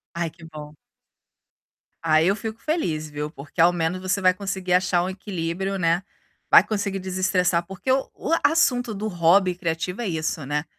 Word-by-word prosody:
Ai, 170 -1 -1
que 165 -1 -15
bom. 150 -2 -10 1.3
Aí 160 +1 +4
eu 195 - +3
fico 220 +2 -6
feliz, 160 - -2
viu, 150 +1 -5
porque 145 +1 -4
ao 175 +1 +6
menos 175 +2 -2
você 185 +2 0
vai 185 -1 +4
conseguir 190 -1 -3
achar 180 -1 +3
um 185 - -2
equilíbrio, 190 0 -3
né. 170 +1 +1 0.5
Vai - - +10
conseguir 200 -2 -2
desestressar, 185 -2 0
porque 190 +6 -7
o 265 0 +1
o 320 - -5
assunto 245 -8 +2
do 210 +2 -4
hobby 180 0 +3
criativo 180 +4 -3
é 225 - -2
isso, 160 -2 -2
né, 150 +3 -2
180 Hz, 170 wpm, -23 LUFS, 165-195 Hz, 1.3 s, Vai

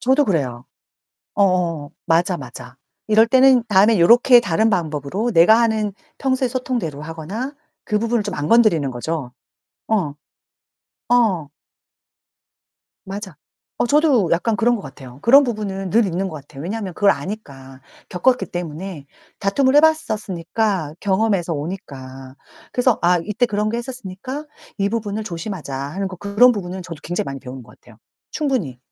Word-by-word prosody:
저도 265 +4 +3
그래요. 130 - -2 0.7
어 200 - +4
어 170 -5 -1
맞아 175 +2 +2
맞아. 125 -1 -10 0.3
이럴 220 +1 +5
때는 260 +1 +5
다음에 210 +1 +4
요렇게 240 +7 +7
다른 220 +1 +1
방법으로 170 - -1
내가 205 +6 +6
하는 220 -3 +1 0.3
평소의 260 -1 0
소통대로 240 - -3
하거나 165 - -6 0.3
그 210 -1 0
부분을 230 -1 0
좀 205 -3 -4
안 145 0 -3
건드리는 205 - +4
거죠. 130 +1 -4 0.6
어. 185 -10 0 1.0
어. 190 -11 +2 1.6
맞아. 195 -3 -7 0.4
어 - - +1
저도 280 - +3
약간 210 +7 +1
그런 240 +1 +2
것 200 - -8
같아요. 130 -6 -11
그런 275 +5 +7
부분은 200 -6 -3
늘 230 +1 +4
있는 190 +2 -2
것 155 -5 -7
같아요. 140 0 -12
왜냐하면 195 0 -4
그걸 200 +2 +4
아니까 140 -6 -6 0.3
겪었기 250 +8 +1
때문에 175 -2 -6 0.3
다툼을 260 +7 +2
해 295 - +8
봤었으니까 205 - 0
경험에서 195 -3 +1
오니까. 135 -5 -7 0.4
그래서 250 -2 +2
아 175 +1 +4
이때 225 +4 0
그런 210 -1 -1
게 235 - -2
했었으니까 255 +3 -7 0.3
이 200 0 +1
부분을 215 -1 -3
조심하자 170 -5 -6
하는 145 +9 -4
거 190 -1 -7
그런 205 +7 +4
부분은 190 -3 -5
저도 165 -4 -9
굉장히 175 +1 -2
많이 135 -1 -6
배우는 125 0 -9
것 115 - -19
같아요. - - -18 0.3
충분히 250 - -2
195 Hz, 330 characters per minute, -20 LUFS, 160-230 Hz, 1.6 s, 해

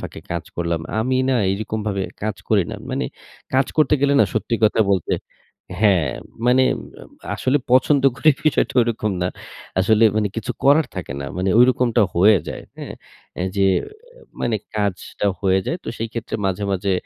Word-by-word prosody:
ফাঁকে - - -8
কাজ - - -3
করলাম। 85 -1 -1 0.2
আমি 130 +4 +1
না 135 - +2 0.2
এইরকম 110 +2 -3
ভাবে 100 -2 -1 0.2
কাজ 105 -1 -2
করি 105 -4 +4
না। - - -5
মানে - - -1 0.5
কাজ 130 0 +3
করতে 150 -2 +4
গেলে 140 0 +3
না - - +6
সত্যি 115 +2 -1
কথা 110 - +3
বলতে 95 -4 0 0.7
হ্যাঁ, 95 -9 +3 0.4
মানে 125 +1 +5
আম - - -12 0.2
আসলে 130 +3 +1
পছন্দ 130 +2 +4
করি 145 +4 +4
বিষয়টা 155 - +1
ওইরকম 115 -3 0
না। 90 - +1 0.5
আসলে 110 +3 +4
মানে 105 -1 +1
কিছু 125 +2 -3
করার 145 +3 +5
থাকে 90 -8 -5
না। 70 - -5
মানে 95 +1 0
ঐরকমটা 125 -2 +4
হয়ে 100 +3 +6
যায়। - - -6 0.2
হ্যাঁ, - - -7 0.4
অ্যা 90 - -2
যে 100 0 +3 0.5
অ্যা - - -19 0.2
মানে 115 -2 0 0.2
কাজটা 100 -1 -2
হয়ে 95 -1 +3
যায়। 170 - -1
তো - - -6
সেই 115 - -3
ক্ষেত্রে 115 -1 -4
মাঝে, 95 +1 -2
মাঝে 95 +1 0
110 Hz, 175 wpm, -21 LUFS, 95-130 Hz, 0.7 s, না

